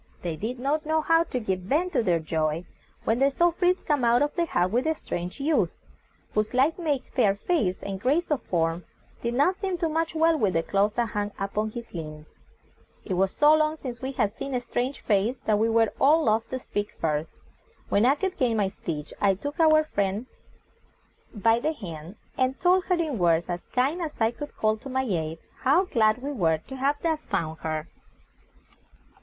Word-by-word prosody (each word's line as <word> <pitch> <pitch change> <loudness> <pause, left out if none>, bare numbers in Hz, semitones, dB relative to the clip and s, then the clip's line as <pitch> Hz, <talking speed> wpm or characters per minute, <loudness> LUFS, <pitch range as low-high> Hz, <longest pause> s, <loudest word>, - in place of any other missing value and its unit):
They 170 -2 -2
did 225 +9 -4
not 280 +5 0
know 315 +1 +1
how 330 +1 +3
to 255 - -3
give 190 -5 -1
vent 305 - 0
to 275 - +3
their 180 -6 +2
joy 160 +1 -1 0.4
when 225 +2 +1
they 275 +1 +4
saw 345 +5 +3
Fritz 360 +2 +1
come 290 -4 0
out 235 +3 +4
of 295 - -1
the 340 -1 0
hut 185 - +1
with 250 +7 +1
a 320 - +2
strange 175 - -5
youth, 300 +3 +1 0.6
whose 215 0 +1
slight 275 +7 +2
make, 295 -6 0
fair 205 -7 +3
face, 200 - -1
and 195 -1 -5
grace 300 +8 +1
of 295 - +1
form, 165 0 -1 0.4
did 235 0 -2
not 355 +8 +3
seem 380 -3 -2
to 340 -1 0
match 325 +1 -1
well 325 +1 +4
with 200 -7 +1
the 165 - +2
clothes 200 +3 +1
that 235 -1 0
hung 205 0 -2
upon 205 +2 -2
his 235 +1 -8
limbs. 155 -2 -8 0.7
It 195 - -2
was 190 +1 +2
so 295 +9 +5
long 310 0 +2
since 255 -5 -7
we 265 +1 -4
had 205 -5 0
seen 270 +3 -5
a - - +1
strange 245 +3 -3
face, 215 +4 +1
that 210 -1 +2
we 225 +1 +2
were 225 -1 +3
all 310 +4 +5
loth 220 -2 +1
to 260 - -2
speak 205 -4 -4
first. 155 0 -1 0.6
When 200 - +3
I 265 +4 +5
could 380 +5 -3
gain 235 -3 +1
my 200 -2 +1
speech 155 -5 -6
I 195 -1 +4
took 285 - -6
our 310 -1 +6
new - - -3
friend 205 -5 -1 1.1
by 225 +1 +2
the 310 +6 0
hand, 170 - -8 0.2
and 260 +1 +1
told 365 +1 +3
her 365 - +2
in 315 - -2
words 170 -1 +2
as 175 0 -2
kind 275 +8 +1
as 315 -3 -5
I 225 0 +3
could 290 +4 -9
call 215 0 +1
to 270 - -10
my 265 0 0
aid, 165 -8 -2 0.2
how, 290 +9 +3
glad 220 -4 +2
we 285 - -2
were 165 - +2
to 265 - -10
have 275 +3 +1
thus 320 -2 -1
found 160 0 -2
her. 155 0 -3
240 Hz, 210 wpm, -26 LUFS, 195-300 Hz, 1.1 s, our